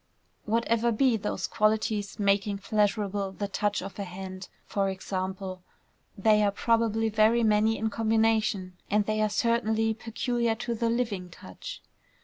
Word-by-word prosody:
Whatever 230 +1 +1
be 245 +2 +3
those 210 -1 -2
qualities 215 -2 0
making 200 0 +1
pleasurable 205 -1 0
the 205 +1 -3
touch 205 -1 -1
of 195 +1 -8
a - - -1
hand, 185 0 -8 0.2
for 195 -1 0
example, 190 0 -4 0.6
they 210 +1 +4
are 205 - +4
probably 225 +1 +1
very 220 +2 +3
many 220 +1 +3
in 220 0 -1
combination, 220 -3 +1 0.2
and 210 0 +2
they 215 0 0
are 215 - +2
certainly 225 0 +1
peculiar 230 +1 -1
to 235 +1 -3
the 230 0 0
living 225 -7 -1
touch. 95 - -10
215 Hz, 140 wpm, -28 LUFS, 200-225 Hz, 0.6 s, they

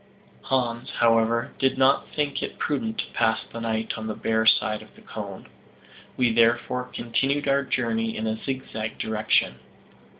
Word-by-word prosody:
Hans, 120 -2 -1
however, 115 0 +3
did 135 0 +2
not 135 +1 +4
think 145 -2 -1
it - - -5
prudent 225 +9 -1
to - - -3
pass 110 -1 +2
the 115 - -5
night 110 -1 -1
on 110 - -5
the 110 - -3
bare 110 0 +1
side 110 -1 +3
of - - -16
the - - -17
cone. - - -7 0.7
We 125 -3 +3
therefore 120 +2 +2
continued 135 +4 -1
our 140 0 +3
journey 115 -3 -1
in 110 - -2
a 110 0 -2
zigzag 115 -5 -4
direction. 110 0 +1
115 Hz, 160 wpm, -25 LUFS, 110-130 Hz, 0.7 s, not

